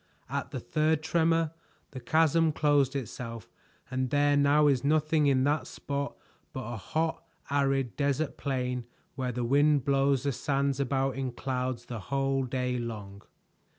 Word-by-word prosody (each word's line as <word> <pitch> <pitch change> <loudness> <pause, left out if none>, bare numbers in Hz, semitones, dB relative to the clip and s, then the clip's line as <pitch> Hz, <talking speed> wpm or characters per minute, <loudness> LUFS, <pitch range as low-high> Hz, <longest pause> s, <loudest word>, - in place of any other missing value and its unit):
At - - -2
the - - -4
third 155 0 +1
tremor, 165 -1 +2 0.4
the 130 - -7
chasm 160 +4 +3
closed 145 -3 +2
itself 115 -3 -6 0.4
and 130 0 -1
there 145 +1 +3
now 145 +1 +4
is 135 -4 +3
nothing 155 +1 +2
in 130 -2 +3
that 145 +2 +1
spot 140 0 -4 0.4
but 130 - -4
a 120 +2 -5
hot 160 - -2 0.3
arid 135 -3 +1
desert 140 +1 0
plain 125 -3 -2 0.3
where 130 -2 -2
the 120 0 -2
wind 145 +2 +3
blows 135 -1 +2
the 140 - +1
sands 140 +1 0
about 135 0 0
in 130 -2 -2
clouds 125 -2 -3
the 120 -2 -6
whole 135 +3 0
day 125 -1 -1
long." 105 -4 -6
135 Hz, 150 wpm, -29 LUFS, 125-145 Hz, 0.4 s, now